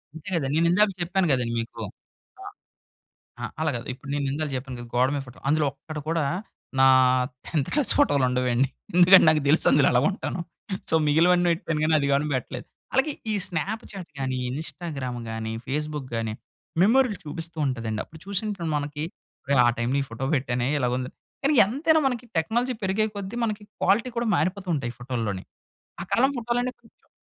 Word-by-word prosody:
అంతే 160 +4 -8
కదండి. 140 -4 -1
నేను 165 +1 +4
ఇందాక 210 +4 +5
చెప్పాను 180 +1 +1
కదండి 125 -3 +1
మీకు. 115 - -6 0.6
ఆ! - - -9 1.0
ఆహ్, - - -4
అలా 160 - +2
కాదు 115 - -6
ఇప్పుడు 135 +2 -12
నేను 145 -1 -1
ఇందాల 150 +1 -2
చెప్పాను 130 0 -5
గదా, 120 -1 -9
గోడ 125 +1 +4
మీద 140 - -1
ఫోటో. 120 - -13
అందులో 155 0 +3
ఒక్కటి 150 +2 -8
కూడా 165 -2 +1 0.5
నా 135 - +7 0.6
10త్ 150 -5 -1
క్లాస్ 295 -3 +2
ఫోటోలు 145 - +4
ఉండవండి. 125 +1 +2 0.3
ఎందుకంటే 180 +1 +8
నాకు 155 -1 +3
తెలుసు 155 +4 +4
అందులో 140 0 +5
ఎలా 125 - +4
ఉంటానో. 190 -2 -4 0.5
సో - - +3
మిగిలినవన్నీటి 170 +2 +4 0.2
కానీ 155 +1 +3
అది 140 - 0
గాని 140 +2 +2
పెట్టలేదు 125 0 -4 0.3
అలాగే 270 +4 +2 0.2
ఈ - - +1
స్నాప్‌చాట్ 195 +1 -4
గానీ, 130 -1 -1
ఇన్‌స్టాగ్రామ్ 145 -3 -4
గానీ, 110 0 -4
ఫేస్‌బుక్ 150 0 -3
గానీ. 115 -1 -2 0.5
మెమోరీలు 230 +1 +4
చూపిస్తూ 165 +2 -5
ఉంటదండి. 115 -5 -2
అప్పుడు 160 - -15
చూషినప్పుడు 200 -3 -2
మనకి 145 +1 -3 0.4
ఒరేయ్! 140 -1 +2
ఆ - - +5
టైమ్‌లో 125 +4 0
ఈ - - 0
ఫోటో 115 +3 -4
పెట్టానే 125 -2 -1
ఇలాగుంది. 125 -1 -1 0.3
కానీ 280 +2 +3
ఎంతైనా 305 +9 +2
మనకి 245 -2 -3
టెక్నాలజీ 240 +10 +1
పెరిగే 195 +3 +1
కొద్దీ 200 +2 -5
మనకి 215 -2 -2 0.2
క్వాలిటీ 225 +5 +3
కూడా 235 0 0
మారిపోతుంటాయి 170 - -1
ఫోటోల్లోని. 115 -6 -3 0.6
ఆ - - -5
కాలం 265 +3 +4
ఫోటోలన్నీ 240 +1 -1
కొంచెం 230 - -26
155 Hz, 165 wpm, -25 LUFS, 130-195 Hz, 1.0 s, ఎందుకంటే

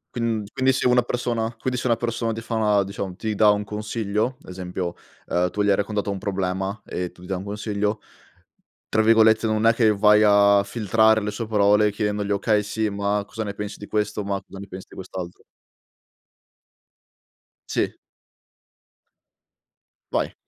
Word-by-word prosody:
Quin 115 -3 -1
quindi 130 0 +3
se 130 - +1
una 125 0 +5
persona, 120 -1 -2
quindi 125 +1 -2
se 125 - -2
una 115 -2 +3
persona 115 -1 -2
ti 110 - -4
fa 115 0 -6
una 105 -2 +3
diciamo, 100 -1 -5
ti 110 -1 -3
dà 105 0 +5
un 105 0 +2
consiglio, 105 +3 -2
esempio, 90 -1 -5 0.3
ehm 90 +1 +1
tu 105 - -2
gli 105 - +2
hai 100 - +5
raccontato 100 +1 -2
un 100 -1 -3
problema 95 0 -2
e 90 -1 -4
tu 90 0 -19
gli - - -11
dai 95 +1 -2
un - - -7
consiglio, 105 +1 -2 0.9
tra 110 0 +2
virgolette 110 0 +5
non 110 0 +2
è 115 - +5
che 110 -3 +3
vai 105 +1 +5
a 100 -1 +5
filtrare 110 +1 +3
le 105 - -2
sue 110 +2 -4
parole 105 -1 +3
chiedendogli: 105 -1 -2
"Okay, 105 +1 +2
sì, 110 +1 -1
ma 100 0 -1
cosa 110 - -5
ne 100 -2 -4
pensi 105 0 -6
di 105 - -9
questo? 105 0 -1
Ma 100 0 -2
cosa 95 0 -13
ne 100 - -7
pensi 95 0 -9
di - - -14
quest'altro?" 90 -2 -8 2.2
Sì. - - -1 2.2
Vai. - - -1
105 Hz, 175 wpm, -23 LUFS, 100-110 Hz, 2.2 s, una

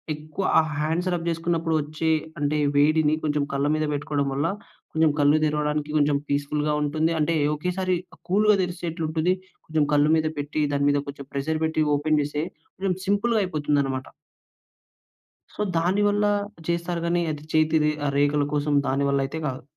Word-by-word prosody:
ఎక్కువ 155 +5 -6 0.2
ఆ - - +6 0.2
hands 165 +4 0
rub 170 0 -4
చేసుకున్నప్పుడు 165 -1 -1
వచ్చే 155 +2 -1 0.3
అంటే, 145 +1 +1 0.2
వేడిని 155 +1 +4
కొంచెం 150 -1 +1
కళ్ళ 140 +1 0
మీద 155 0 0
పెట్టుకోవడం 145 0 -1
వల్ల, 140 +4 0 0.5
కొంచెం 160 -1 +3
కళ్ళు 145 +1 +5
తెరవడానికి 150 0 -1
కొంచెం 145 0 +3
పీస్‌ఫుల్‍గా 150 +1 0
ఉంటుంది. 155 +3 0
అంటే, 165 +2 +1 0.2
ఒకేసారి 180 +3 -1 0.3
కూల్‌గా 210 +2 +4
తెరిసేట్లు 175 -2 -4
ఉంటది. 160 +3 +1 0.3
కొంచెం 155 -2 +1
కళ్ళు 145 +1 +4
మీద 155 0 +1
పెట్టి, 150 +1 -1
దాని 140 0 +2
మీద 145 - +2
కొంచెం 140 -1 -9
ప్రెషర్ 155 +3 -1
పెట్టి, 160 0 +1
ఓపెన్ 155 +1 +1
చేస్తే, 150 +1 -2 0.3
కొంచెం 190 -1 -1
సింపుల్‌గా 210 +3 +2
అయిపోతుందనమాట. 145 -6 -1 1.5
సో, - - -5 0.2
దాని 180 +5 +1
వల్ల 205 +1 +1 0.4
చేస్తారు 170 0 -1
గాని, 175 +1 +1
అది 150 -1 -6
చేతి 155 0 +3
రే 150 - +3
ఆహ్, 140 - 0
రేఖల 145 +1 +3
కోసం 145 0 0
దానివల్ల 140 +1 +1
అయితే 145 +4 -5
కాదు. 130 -1 -5
155 Hz, 160 wpm, -24 LUFS, 145-165 Hz, 1.5 s, ఆ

